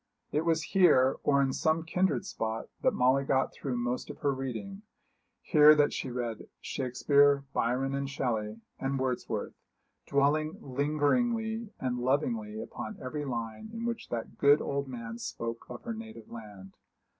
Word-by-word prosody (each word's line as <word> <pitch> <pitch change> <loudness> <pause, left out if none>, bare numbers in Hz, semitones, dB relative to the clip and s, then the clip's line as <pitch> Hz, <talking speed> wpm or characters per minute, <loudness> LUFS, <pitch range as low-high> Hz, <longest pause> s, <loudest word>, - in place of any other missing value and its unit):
It 155 +3 0
was 165 -1 +2
here, 150 -10 +4
or 140 -1 +3
in 135 -1 0
some 160 +1 +1
kindred 165 -6 0
spot, 110 0 -3
that - - +2
Molly 130 +2 +3
got 135 0 +1
through 130 -3 -3
most 120 +1 -2
of - - -7
her 140 -2 +2
reading 135 - -5 0.6
here 150 -2 +7
that 145 -1 +3
she 130 - -3
read 120 -3 -4
Shakespeare, 140 +2 +2
Byron, 130 +3 0
and 140 0 -2
Shelley, 115 -5 -2 0.2
and 135 +1 -1
Wordsworth 130 -2 -2 0.5
dwelling 150 +3 +2
lingeringly 220 - 0
and 125 -1 -1
lovingly 120 -5 0
upon 110 -1 -6
every 145 +3 -4
line 115 - -4
in 230 +1 -5
which 235 -1 -3
that 115 -2 -5
good 145 +1 +6
old 140 0 -2
man 115 -2 -6
spoke 115 0 -5
of - - -8
her 230 - -3
native 220 - -10
land. 105 -4 -10
135 Hz, 155 wpm, -30 LUFS, 120-150 Hz, 0.6 s, here